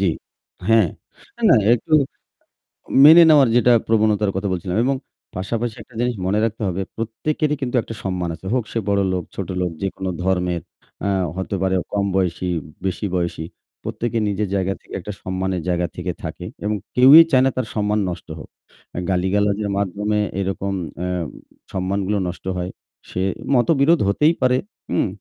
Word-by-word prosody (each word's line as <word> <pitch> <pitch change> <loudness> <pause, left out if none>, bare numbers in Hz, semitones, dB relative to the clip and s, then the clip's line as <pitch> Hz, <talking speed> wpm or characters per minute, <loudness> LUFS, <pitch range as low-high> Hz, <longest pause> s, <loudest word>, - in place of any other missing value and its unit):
জ্বি। 95 -3 +3 0.6
হ্যাঁ। 115 -3 +5 0.5
অ্যা 235 - -13
না, - - +7 0.2
একটু 125 +6 -6 1.1
মেনে 165 +3 +10
নেওয়ার 145 -4 +7
যেটা 120 0 +5 0.2
প্রবণতার 105 -2 +2
কথা 95 +1 -1
বলছিলাম। 90 +1 -3
এবং 135 +1 +2 0.4
পাশাপাশি 110 +5 -2
একটা 115 +2 -16
জিনিস 120 0 0
মনে 100 +3 +1
রাখতে 115 0 -2
হবে 95 +1 -2
প্রত্যেকেরই 150 +7 -1
কিন্তু 130 -1 -2
একটা 115 - -8
সম্মান 90 -2 -2
আছে। 95 - -16
হোক 125 - +1
সে 115 - -1
বড়লোক, 95 -3 +1
ছোটলোক 90 -2 -2
যেকোনো 95 -1 -3
ধর্মের 90 -2 0 0.4
আ - - +1 0.3
হতে 95 +1 -3
পারে 95 0 +1 0.2
কম 100 -1 0
বয়সী, 90 -1 0 0.4
বেশি 95 +2 -2
বয়সী। 85 -2 -2 0.4
প্রত্যেকে 115 0 -3
নিজের 105 +1 -1
জায়গা 95 0 0
থেকে - - -15
একটা 105 +3 -6
সম্মানের 95 -1 -2
জায়গা 90 0 0
থেকে - - -3
থাকে। - - -6 0.2
এবং 105 +1 0 0.2
কেউই 135 +6 +9
চায় 130 -1 +5
না - - +4
তার 130 - 0
সম্মান 105 0 +1
নষ্ট 85 - -7
হোক। - - -11 0.4
অ্যা - - -4
গালিগালাজের 100 +3 +1
মাধ্যমে 105 +2 -1 0.2
এরকম 95 0 -2 0.3
অ্যা 90 +1 -2 0.6
সম্মানগুলো 95 +2 -1
নষ্ট 90 +1 -7
হয়। 90 0 -3 0.4
সে 90 - -3 0.3
মতবিরোধ 145 +5 +4
হতেই 150 +11 +3
পারে, 125 0 +3 0.3
হুম? - - +1
100 Hz, 155 wpm, -21 LUFS, 95-115 Hz, 1.1 s, মেনে